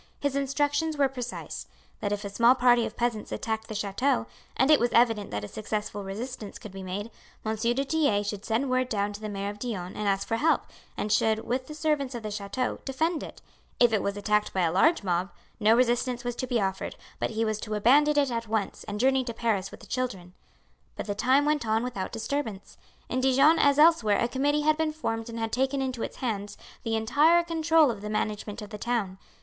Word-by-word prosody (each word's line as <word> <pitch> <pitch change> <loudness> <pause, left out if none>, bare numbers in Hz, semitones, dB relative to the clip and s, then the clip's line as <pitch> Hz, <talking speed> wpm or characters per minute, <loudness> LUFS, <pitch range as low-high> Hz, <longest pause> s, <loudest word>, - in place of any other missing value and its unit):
His 285 -1 -1
instructions 290 +3 0
were 280 -1 +4
precise: 250 -2 -6 0.3
that 205 - -2
if 205 0 -2
a - - -3
small 235 +5 +5
party 245 -2 +4
of - - -11
peasants 235 -3 -1
attacked 220 0 -3
the 215 - -6
chateau, 205 - 0 0.3
and 265 +3 +4
it 300 - +7
was 240 - +2
evident 225 -4 +3
that 105 0 -4
a - - -5
successful 210 - -4
resistance 210 +2 -6
could 215 - -10
be 195 0 -8
made, 195 +4 -5 0.3
M. 220 0 0
du 240 +5 0
Tillet 280 -10 +1
should 205 -1 -4
send 240 +5 0
word 255 0 +1
down 205 -2 -1
to 205 - -9
the 215 - -4
mayor 200 0 -3
of 205 - -12
Dijon 195 -7 -4
and 210 - -2
ask 195 0 0
for 225 - 0
help, 320 +5 +2 0.3
and 210 - -2
should, 220 +1 +2
with 255 +2 -2
the 305 - -8
servants 295 -4 0
of 235 - -6
the 215 - -4
chateau, 205 +5 -3
defend 315 +4 -1
it; - - -10 0.4
if 240 -2 +5
it 215 - +2
was 200 0 -2
attacked 210 +1 +1
by 190 - +1
a 165 -2 +2
large 305 - +3
mob, 180 0 0 0.3
no 220 +1 +5
resistance 245 0 +1
was 245 -1 -3
to 255 - -3
be 240 -2 +1
offered, 190 -1 -2 0.2
but - - 0
he 225 0 -1
was 215 -1 -1
to 215 -1 -4
abandon 290 +8 +4
it 280 -3 +3
at 230 -1 -3
once 215 -2 -2
and 210 -1 -5
journey 265 +2 +3
to 235 -2 -5
Paris 215 -5 0
with - - -12
the - - -12
children. 195 -7 -4 0.6
But - - -5
the 205 - -2
time 260 +7 +3
went 300 -2 +1
on 220 0 +1
without 245 -7 -4
disturbance. 225 -3 -4 0.3
In 255 - -1
Dijon 275 +5 +5
as 285 0 +4
elsewhere 300 -10 +5
a 235 - +1
committee 285 +4 +1
had 305 +1 +3
been 320 -1 0
formed 225 -7 -3
and 230 - -6
had 225 -1 -2
taken 265 +3 0
into 255 -3 -2
its - - -4
hands 205 -5 -4 0.2
the 225 0 -1
entire 295 +10 +4
control 325 -3 +3
of 210 -3 -7
the 210 - -5
management 210 0 -3
of 205 - -10
the 210 - -7
town. 205 -5 -2
230 Hz, 225 wpm, -27 LUFS, 210-265 Hz, 0.6 s, it